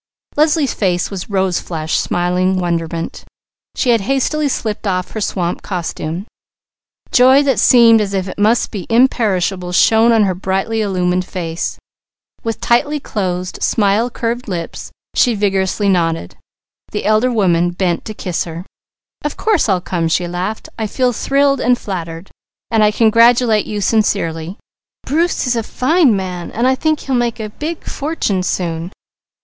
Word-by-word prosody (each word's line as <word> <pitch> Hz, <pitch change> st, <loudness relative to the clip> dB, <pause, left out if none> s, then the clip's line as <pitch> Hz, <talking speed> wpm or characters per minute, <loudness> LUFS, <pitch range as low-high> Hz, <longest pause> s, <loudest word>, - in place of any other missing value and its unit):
Leslie's 300 Hz, -2 st, +2 dB
face 180 Hz, -2 st, 0 dB
was 190 Hz, 0 st, -6 dB
rose 190 Hz, -3 st, 0 dB
flushed 160 Hz, -2 st, -2 dB
smiling 180 Hz, +1 st, 0 dB
wonderment. 170 Hz, -2 st, -3 dB, 0.5 s
She 250 Hz, -, +2 dB
had 230 Hz, -2 st, +3 dB
hastily 275 Hz, +6 st, 0 dB
slipped 215 Hz, -4 st, -3 dB
off 185 Hz, -1 st, -1 dB
her 220 Hz, -, -5 dB
swamp 180 Hz, -3 st, -2 dB
costume. 170 Hz, -1 st, -4 dB, 0.9 s
Joy 260 Hz, +3 st, +6 dB
that 270 Hz, -4 st, +1 dB
seemed 230 Hz, -3 st, +6 dB
as 200 Hz, -1 st, -2 dB
if 190 Hz, -1 st, -1 dB
it 185 Hz, -, -7 dB
must 220 Hz, +3 st, +2 dB
be 200 Hz, -5 st, -6 dB
imperishable 200 Hz, -7 st, +1 dB
shone 225 Hz, +5 st, +4 dB
on 225 Hz, -2 st, +4 dB
her 190 Hz, -2 st, +1 dB
brightly 195 Hz, +4 st, -1 dB
illumined 180 Hz, -3 st, 0 dB
face. 170 Hz, -3 st, -4 dB, 0.7 s
With 225 Hz, -1 st, -3 dB
tightly 290 Hz, +5 st, +1 dB
closed, 185 Hz, -7 st, -4 dB
smile 210 Hz, +3 st, +2 dB
curved 240 Hz, +1 st, -3 dB
lips 170 Hz, -4 st, -5 dB, 0.2 s
she 245 Hz, -3 st, +3 dB
vigorously 195 Hz, 0 st, 0 dB
nodded. 165 Hz, -, 0 dB, 0.6 s
The -, -, -4 dB
elder 215 Hz, +4 st, +3 dB
woman 175 Hz, -6 st, +2 dB
bent 175 Hz, -1 st, -1 dB
to 215 Hz, -, -6 dB
kiss 180 Hz, -4 st, -3 dB
her. 170 Hz, +1 st, -7 dB, 0.6 s
"Of 295 Hz, -, -3 dB
course 420 Hz, -, +1 dB
I'll 185 Hz, -2 st, +2 dB
come!" 175 Hz, -2 st, -2 dB
she 175 Hz, +2 st, 0 dB
laughed. 180 Hz, +5 st, -4 dB
"I 220 Hz, -, -1 dB
feel 250 Hz, +3 st, 0 dB
thrilled, 275 Hz, +3 st, +1 dB
and 245 Hz, 0 st, +3 dB
flattered. 170 Hz, -4 st, -6 dB, 0.4 s
And 220 Hz, -2 st, +3 dB
I 210 Hz, -, +5 dB
congratulate 230 Hz, 0 st, +4 dB
you 210 Hz, -1 st, -3 dB
sincerely. 185 Hz, -5 st, 0 dB, 0.5 s
Bruce 330 Hz, +4 st, 0 dB
is 250 Hz, -1 st, +1 dB
a 230 Hz, -, 0 dB
fine 260 Hz, -, +2 dB
man. 180 Hz, -2 st, -4 dB, 0.5 s
He'll 275 Hz, -, -4 dB
make 240 Hz, -1 st, 0 dB
a 215 Hz, -1 st, -4 dB
big 315 Hz, +7 st, -5 dB
fortune 280 Hz, -, -2 dB
soon." 170 Hz, -1 st, -2 dB
205 Hz, 150 wpm, -17 LUFS, 180-235 Hz, 0.9 s, Joy